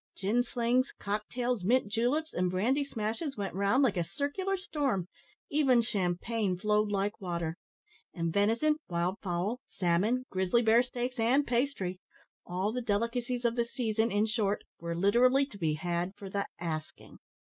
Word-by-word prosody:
Gin 210 +5 +2
slings, 245 +1 +1
cocktails, 215 +2 -2
mint 245 +4 +3
juleps, 245 +9 0
and 180 0 +1
brandy 235 +11 +1
smashes 230 +2 -3
went 195 -3 -3
round 200 +8 +3
like 235 -8 +2
a 175 - +2
circular 330 - -2
storm, 275 - -1 0.4
even 275 -4 +4
champagne 195 0 -1
flowed 210 +2 +2
like 200 +1 -1
water; 170 -3 -2 0.6
and 165 -2 -2
venison, 230 +10 +3
wild 175 +3 -1
fowl, 190 +6 -1
salmon, 205 +8 +1
grizzly 190 +5 +2
bear 225 +1 +6
steaks, 250 0 -4
and 255 +6 +3
pastry 235 -8 -1 0.5
all 185 +4 -1
the 250 +2 -2
delicacies 240 +3 -1
of 235 0 +2
the 235 - +2
season, 225 -2 0
in 205 +2 +2
short 215 -2 0 0.2
were 170 0 -3
literally 245 +9 +4
to 210 -8 -13
be 155 -3 +1
had 175 +3 -2
for 195 -2 -9
the 200 0 -1
asking. 155 -2 -6
215 Hz, 155 wpm, -31 LUFS, 185-250 Hz, 0.6 s, bear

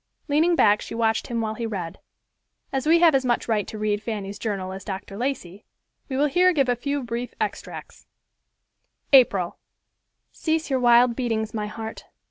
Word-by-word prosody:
Leaning 320 +4 +3
back 210 -7 +4
she - - -7
watched 225 -1 +1
him 235 -1 -2
while 220 -1 -2
he 230 +1 -4
read. 185 -6 -5 0.7
As 270 +2 -1
we 330 +2 +6
have 335 -3 +6
as 270 -1 +2
much 245 -2 0
right 215 -3 0
to 215 - -7
read 210 -1 -1
Fanny's 205 -3 -5
journal 195 -4 -3
as 190 0 -8
Dr. 195 0 -6
Lacey, 215 -6 -4 0.5
we 260 - -2
will 290 - +3
here 360 +5 +4
give 275 -5 +2
a 245 - +2
few 280 +3 -3
brief 240 +1 -5
extracts: - - -6 1.1
April—"Cease 270 - 0
your 265 - +2
wild 240 0 +5
beatings, 225 -4 -2
my 210 -2 -3
heart. 220 +1 -7
230 Hz, 170 wpm, -24 LUFS, 210-270 Hz, 1.1 s, we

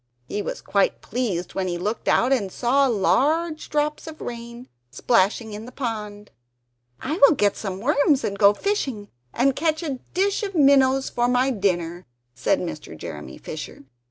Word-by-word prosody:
He 205 - -3
was - - -5
quite 200 -1 +1
pleased 205 -7 -2
when 190 -1 -2
he 175 -1 -2
looked 210 +6 -3
out 255 +3 +3
and 200 -8 -1
saw 270 +6 +2
large 310 - +1
drops 300 +1 -1
of 315 -1 -9
rain, 235 +1 -7 0.2
splashing 210 - +1
in 210 +2 -7
the 250 - -10
pond 210 -5 -5 0.7
"I 305 +5 -3
will 280 +3 +8
get 205 -5 +2
some 195 -3 -5
worms 285 +3 +2
and 200 - -2
go 200 -1 +7
fishing 265 - -2 0.2
and 265 +2 +2
catch 315 +2 0
a 275 -5 -3 0.2
dish 395 +3 +1
of 395 -3 -4
minnows 270 -2 +4
for 240 0 +1
my 250 +2 +2
dinner," 180 -5 -1 0.3
said 190 +11 +1
Mr. 155 - -6
Jeremy 75 -3 -8
Fisher. 155 -2 -8
240 Hz, 165 wpm, -23 LUFS, 200-280 Hz, 0.7 s, will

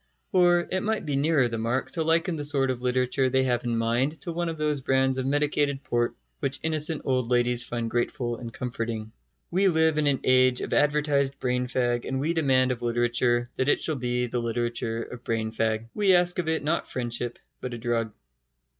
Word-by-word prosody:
Or 175 -3 +4
it 185 - 0
might 220 -3 -1
be 145 -2 -1
nearer 140 -2 +3
the 115 -1 -4
mark 120 +4 -1
to 165 - -2
liken 165 +2 +2
the 150 - -4
sort 140 -3 +1
of 125 -1 -5
literature 125 +1 +1
they 130 +1 +2
have 125 -2 0
in 120 -1 -1
mind 120 +7 0
to 170 - -4
one 170 0 -2
of 165 - -5
those 150 -2 0
brands 130 0 +1
of 130 - -2
medicated 145 -1 +1
port 120 0 0 0.2
which 135 +1 -1
innocent 160 0 0
old 130 -3 0
ladies 120 -1 +2
find 120 -1 -3
grateful 120 0 -2
and 115 -1 -7
comforting. 115 -3 -4 0.4
We 190 +3 +3
live 160 -3 +3
in 150 - +2
an 140 -2 +1
age 130 -1 +4
of - - -3
advertised 145 -2 +2
brain 125 0 -1
fag, 120 -1 0
and 130 0 -2
we 155 +5 0
demand 130 -5 +2
of 120 -1 -4
literature 120 0 +1
that 130 +2 +1
it - - +3
shall 155 - -1
be 125 -1 -1
the 120 0 -2
literature 115 0 -2
of 120 0 -10
brain 110 -1 -2
fag. 110 0 -1
We 200 -3 +4
ask 175 0 +2
of 170 - -2
it 160 -2 0
not 155 +3 -1
friendship, 120 -1 -3 0.2
but 125 -2 -5
a - - -6
drug. 115 -1 -1
130 Hz, 210 wpm, -26 LUFS, 120-150 Hz, 0.4 s, Or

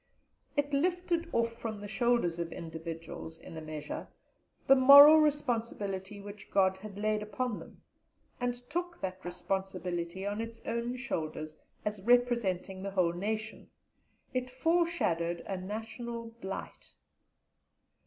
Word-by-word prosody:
It 290 0 +1
lifted 345 +2 +1
off 230 0 +2
from 225 -2 -5
the 205 - -7
shoulders 225 -6 +1
of 170 -1 -3
individuals, 165 0 -7
in - - -11
a 160 - -5
measure, 155 -1 -6 0.6
the 270 - +8
moral 285 +4 +10
responsibility 225 -9 -1
which 205 0 -10
God 190 -1 +3
had 200 0 -9
laid 215 0 +1
upon 215 +2 -2
them, - - -14 0.6
and 245 -1 0
took 345 +4 -3
that 185 0 -4
responsibility 180 0 -3
on 205 +2 -2
its 230 0 -6
own 235 +1 -2
shoulders, 155 -10 -4 0.3
as 210 -1 -2
representing 225 -5 +2
the 195 - -3
whole 180 -3 +2
nation; 215 +4 -3 0.6
it 255 0 -1
foreshadowed 255 - +1
a 195 - -4
national 225 +4 -5
blight. 190 0 -7
210 Hz, 125 wpm, -31 LUFS, 185-245 Hz, 0.6 s, moral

